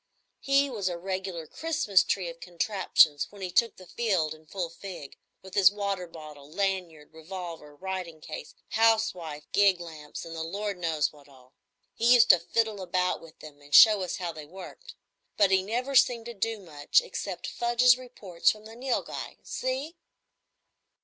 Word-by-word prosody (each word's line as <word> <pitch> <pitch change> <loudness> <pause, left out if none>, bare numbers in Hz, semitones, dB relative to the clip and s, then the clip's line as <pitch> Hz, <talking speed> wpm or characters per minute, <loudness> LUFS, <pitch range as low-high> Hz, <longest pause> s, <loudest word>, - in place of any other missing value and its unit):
He 275 +1 +3
was 210 -8 -2
a 175 - -4
regular 185 -2 -4
Christmas 305 - +1
tree 185 -3 -1
of 170 0 -8
contraptions 175 -4 +2
when 200 -2 -11
he 180 - -4
took 230 +3 +2
the 185 - -13
field 180 -6 0
in 155 0 -18
full 180 0 -3
fig, 175 -6 -9 0.3
with 190 -1 -12
his 195 -3 +7
water 200 -3 -3
bottle, 150 -3 -12
lanyard, 175 -4 -3
revolver, 160 -2 -8
writing 185 -1 -5
case, - - -9
housewife, 215 -9 +1
gig 200 -3 +4
lamps, 155 -3 -9
and 165 0 -8
the 160 - -4
Lord 200 +3 -4
knows 160 -4 0
what 145 -1 -18
all. 130 -1 -20 0.4
He 240 +2 +5
used 240 - +7
to 180 - +4
fiddle 220 -1 -1
about 180 0 -1
with 165 -1 -16
'em 145 -2 -12
and 145 0 -2
show 215 -3 +9
us 180 - -3
how 175 -2 -3
they 155 -2 -10
worked; 190 - -11 0.4
but 200 -2 +4
he 190 0 +4
never 245 +7 -3
seemed 240 -3 +4
to 235 - -6
do 225 +1 -2
much 155 - +1
except - - -6
fudge 240 0 -1
his 250 0 +8
reports 230 -9 -1
from 215 0 -3
the 220 +1 -11
Nilghai. 255 +1 -3
See?" 270 +6 -4
185 Hz, 175 wpm, -28 LUFS, 165-220 Hz, 0.4 s, show